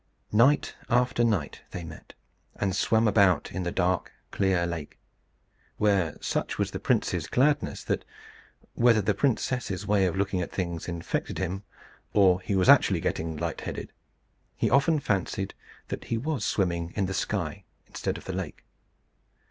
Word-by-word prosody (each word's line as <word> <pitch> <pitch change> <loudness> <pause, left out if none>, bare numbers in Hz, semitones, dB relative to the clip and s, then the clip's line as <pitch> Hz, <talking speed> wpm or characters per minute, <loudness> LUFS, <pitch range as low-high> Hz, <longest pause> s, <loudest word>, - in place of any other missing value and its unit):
Night 130 +7 +4 0.2
after 125 0 +2
night 105 -10 0
they 90 - -6
met, 80 -1 -11 0.4
and 95 -2 -1
swam 110 +3 +3
about 100 -6 +3
in 95 - -3
the 90 -1 -2
dark 90 0 0 0.2
clear 95 -3 +1
lake; 85 -4 -5 0.8
where 95 -7 +2
such - - -2
was - - -1
the - - -4
prince's - - 0
gladness, 145 +4 +1
that - - -1 0.7
(whether 120 -2 +4
the 105 +1 +1
princess's 115 -4 -1
way 100 -2 +3
of 85 - -2
looking 95 -1 0
at 85 - -4
things 85 -3 -3
infected 85 -1 -3
him, 95 +3 -2 0.5
or 95 -3 +5
he 100 +1 -2
was 95 -1 +2
actually - - +6
getting 80 -1 -2
light 85 +1 -3
headed) - - -6 0.6
he - - 0
often 150 +4 +4
fancied 95 -4 -1 0.4
that - - -5
he 115 - -1
was 145 +4 -2
swimming 85 -3 0
in 100 - +1
the 95 - -3
sky - - -2 0.2
instead - - -3
of - - -12
the 95 - -4
lake. 90 -4 -5
95 Hz, 155 wpm, -27 LUFS, 90-110 Hz, 0.8 s, actually